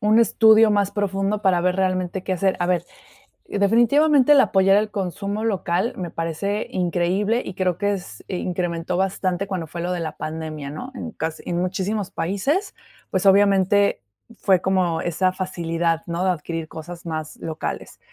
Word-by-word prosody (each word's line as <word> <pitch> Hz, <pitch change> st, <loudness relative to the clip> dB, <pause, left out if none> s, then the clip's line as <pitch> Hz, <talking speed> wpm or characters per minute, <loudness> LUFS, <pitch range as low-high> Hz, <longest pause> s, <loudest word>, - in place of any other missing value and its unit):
un 215 Hz, +2 st, +4 dB
estudio 220 Hz, -1 st, +5 dB
más 200 Hz, -1 st, +2 dB
profundo 200 Hz, +1 st, -1 dB
para 185 Hz, -3 st, +3 dB
ver 180 Hz, +1 st, +1 dB
realmente 185 Hz, -1 st, -1 dB
qué 190 Hz, -, -2 dB
hacer. 190 Hz, +1 st, +1 dB
A 175 Hz, -, +1 dB
ver, 175 Hz, -1 st, +1 dB, 0.6 s
definitivamente, 250 Hz, +8 st, +4 dB
el 280 Hz, -, +6 dB
apoyar 195 Hz, +1 st, +4 dB
al 210 Hz, 0 st, 0 dB
consumo 200 Hz, +2 st, -3 dB
local 195 Hz, +1 st, 0 dB
me 175 Hz, -3 st, -5 dB
parece 185 Hz, +6 st, -2 dB
increíble 185 Hz, +6 st, 0 dB
y 190 Hz, -, -6 dB
creo 180 Hz, -2 st, 0 dB
que 205 Hz, +1 st, 0 dB
es 190 Hz, -2 st, -8 dB
e 185 Hz, -, -3 dB
incrementó 175 Hz, -1 st, -2 dB
bastante 190 Hz, 0 st, -1 dB
cuando 180 Hz, -5 st, -4 dB
fue 170 Hz, +2 st, -6 dB
lo 180 Hz, +1 st, -2 dB
de 180 Hz, -, -2 dB
la 155 Hz, -2 st, -5 dB
pandemia, 155 Hz, -2 st, -5 dB
¿no? 250 Hz, -, -7 dB
En 240 Hz, -, -6 dB
casi 160 Hz, -3 st, -5 dB
en 175 Hz, 0 st, -2 dB
muchísimos 190 Hz, +2 st, -2 dB
países, 235 Hz, -, -1 dB, 0.4 s
pues, 190 Hz, +1 st, 0 dB
obviamente 200 Hz, 0 st, +4 dB, 0.4 s
fue 190 Hz, -2 st, +3 dB
como 180 Hz, -4 st, +1 dB
esa 185 Hz, +2 st, +1 dB
facilidad, 170 Hz, -3 st, -1 dB
¿no?, 170 Hz, +2 st, -2 dB
de 185 Hz, -, +3 dB
adquirir 165 Hz, -1 st, -4 dB
cosas 170 Hz, +2 st, -9 dB
más 155 Hz, -1 st, -5 dB
locales. 160 Hz, -1 st, -5 dB
185 Hz, 170 wpm, -22 LUFS, 170-205 Hz, 0.6 s, el